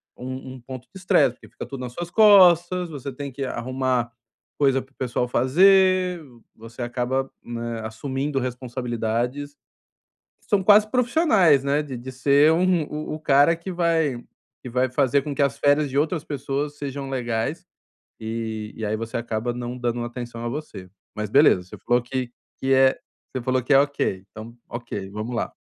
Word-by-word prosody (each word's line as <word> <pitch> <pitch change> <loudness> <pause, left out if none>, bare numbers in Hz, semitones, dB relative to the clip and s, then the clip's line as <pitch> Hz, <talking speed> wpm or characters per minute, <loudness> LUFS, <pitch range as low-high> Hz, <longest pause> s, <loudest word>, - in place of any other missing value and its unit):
um 130 +1 -7
um 130 - -12
ponto 130 +1 -8
de 190 - -10
estresse, 145 -8 +3
porque - - -18
fica - - -8
tudo 135 - -8
nas 125 -1 -6
suas 175 +4 -6
costas, 180 -4 +6
você 140 -2 -6
tem 140 +2 -7
que 135 +2 -5
arrumar 130 -1 -1 0.5
coisa 135 -2 +3
para 130 - -18
o - - -35
pessoal 125 -1 -1
fazer, 185 +7 +4 0.3
você 115 +2 -11
acaba, 125 +2 -2 0.2
eh, 120 -1 -4
assumindo 135 +5 -3
responsabilidades 125 +2 -3 0.9
são 205 -3 0
quase 210 +2 +6
profissionais, 235 - +3
né, 140 +2 +1
de 140 -4 -7
de 125 +2 -8
ser 140 +4 +4
um 175 -1 +2
o-o 155 0 -5
cara 145 +2 +4
que 170 +3 -7
vai 165 -8 0 0.4
que 125 - -7
vai 125 +2 +1
fazer 135 +1 +2
com 145 0 -4
que 140 - 0
as 140 0 0
férias 145 0 +2
de 140 - -1
outras 160 +1 0
pessoas 145 +1 -3
sejam 140 -1 -5
legais, 120 -4 -2 0.5
e 110 -1 -4
e 110 - -5
aí 105 +1 -1
você 115 +1 -5
acaba 115 0 -2
não 120 +1 -5
dando 120 -1 -2
atenção 120 -1 -7
a - - -1
você. 115 -9 -7 0.3
Mas, 105 0 -4
beleza, 140 -8 +5
você 90 - -11
falou 120 0 +1
que 125 0 -4 0.3
que 135 0 0
é 130 0 +4 0.4
você 130 - -3
falou 130 +1 +1
que 135 +3 +2
é 135 - +8
OK, 140 -9 -1
então 115 +2 -10
OK, 120 -5 -6
vamos 105 +4 -5
lá. - - -2
130 Hz, 175 wpm, -23 LUFS, 120-150 Hz, 0.9 s, é